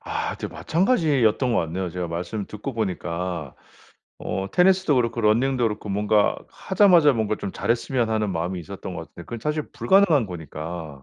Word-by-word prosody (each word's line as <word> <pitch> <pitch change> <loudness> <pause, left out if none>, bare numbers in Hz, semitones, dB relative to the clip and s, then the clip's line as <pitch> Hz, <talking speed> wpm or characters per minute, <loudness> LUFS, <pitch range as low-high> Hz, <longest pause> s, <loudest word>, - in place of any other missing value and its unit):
아 - - -3
저 - - -4
마찬가지였던 150 - +1
것 115 - +2
같네요 85 +2 -3
제가 90 0 -4
말씀 90 +5 -4
듣고 105 +6 -6
보니까. 90 - -3 0.7
어 95 0 -2
테니스도 185 -3 +4
그렇고 115 -1 0
러닝도 120 +4 +2
그렇고 105 -1 -2
뭔가 105 +1 +2
하자마자 180 -7 +4
뭔가 110 -2 0
좀 100 - -5
잘했으면 120 0 0
하는 110 -2 0
마음이 90 +1 -2
있었던 80 - -8
것 - - -5
같은데 - - -12
그건 115 -2 -7
사실 150 +2 -1
불가능한 180 - +3
거니까. 80 -3 -7
110 Hz, 385 characters per minute, -24 LUFS, 90-135 Hz, 0.7 s, 테니스도